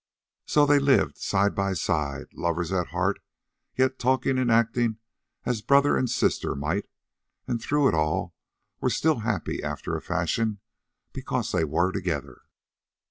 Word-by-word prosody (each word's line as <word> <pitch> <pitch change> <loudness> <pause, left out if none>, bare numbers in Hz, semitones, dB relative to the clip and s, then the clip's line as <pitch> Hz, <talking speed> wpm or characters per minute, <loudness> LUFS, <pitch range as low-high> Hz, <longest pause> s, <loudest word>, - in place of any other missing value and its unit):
So 150 -1 +4
they 145 0 +5
lived 140 -1 +3
side 100 0 +1
by 100 -1 0
side, 75 -5 -2
lovers 85 0 -2
at 90 -2 0
heart, 90 +3 -1 0.6
yet 130 0 +2
talking 130 +1 +1
and 125 -2 +1
acting 115 0 +2 0.5
as 120 -3 -1
brother 140 +4 +4
and 130 - 0
sister - - 0
might, 80 +9 -2 0.6
and 115 -2 -2
through 145 +3 +2
it - - +2
all 80 -1 0 0.5
were - - +1
still 160 -5 +1
happy 110 -2 -2
after - - -4
a - - -4
fashion 100 +6 -1 0.5
because 130 -3 -3
they 85 -3 +1
were 85 +5 +1
together. 75 -9 -4
105 Hz, 145 wpm, -26 LUFS, 85-130 Hz, 0.6 s, they